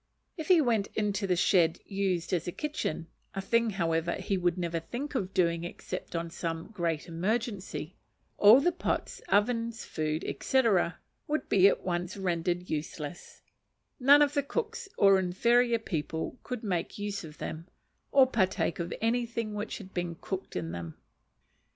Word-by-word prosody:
If 315 -4 -6
he 360 -4 +6
went 225 -7 +1
into 205 -2 0
the 180 - +2
shed 170 -2 +3
used 190 -3 -1
as 170 -2 0
a - - -1
kitchen 290 - -3 0.3
(a - - -2
thing, 230 +3 +2
however, 170 -4 0
he 190 +1 -2
would 175 -1 +1
never 170 -2 -1
think 245 - -5
of 195 -8 -2
doing 170 -2 +1
except 175 - -6
on 165 0 -3
some 165 +3 -4
great 170 -5 -1
emergency), 195 0 -3 0.4
all 215 +5 +9
the 355 - +3
pots, 350 - -2
ovens, 230 +2 +1
food, 155 0 -2 0.2
&c., 265 -1 +3 0.6
would 305 +1 -1
be 195 -1 +6
at - - +1
once 175 +1 -2
rendered 175 -1 -1
useless: 150 +1 -5 0.6
none 285 +3 +7
of 290 0 +1
the 285 - +2
cooks 445 - -4
or 195 -1 +6
inferior 235 +6 +3
people 160 0 -4
could 250 -3 -5
make 180 -5 -2
use 205 -1 -3
of 155 -1 -10
them, 165 +2 -6 0.4
or 270 -1 +7
partake 190 -9 0
of 170 0 -3
anything 230 -1 0
which 210 +1 -4
had 195 -3 -11
been 175 -1 -2
cooked 190 +3 -6
in 85 -2 -3
them. 85 -1 -6
190 Hz, 160 wpm, -30 LUFS, 170-230 Hz, 0.6 s, all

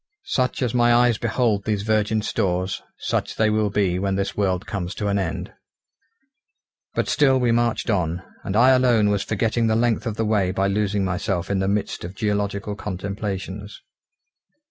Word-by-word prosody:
Such 130 0 0
as 120 -2 -1
my 120 -1 +4
eyes 120 -2 +3
behold 115 -3 0
these 105 -2 -1
virgin 110 0 +1
stores, 90 -2 -1 0.2
such - - -2
they 110 -1 +2
will 105 -1 +1
be 95 -3 +1
when 95 0 0
this 100 0 -2
world 95 -2 0
comes 95 -5 -4
to 105 - -2
an 100 0 +1
end. 95 -4 -4 1.4
But - - 0
still 135 -3 +3
we 120 -2 +2
marched 120 0 +1
on, 90 -2 -1 0.2
and 95 - -3
I 125 +4 +6
alone 120 -5 +4
was 100 -1 +1
forgetting 115 +3 0
the 110 - +2
length 115 +1 +1
of 110 - -2
the 110 - -1
way 105 -4 +2
by 95 +1 0
losing 100 -1 0
myself 95 0 -2
in 100 - +1
the 95 - 0
midst 100 +1 -1
of 90 +3 -7
geological 105 -1 -1
contemplations. 100 0 -5
105 Hz, 175 wpm, -23 LUFS, 95-115 Hz, 1.4 s, I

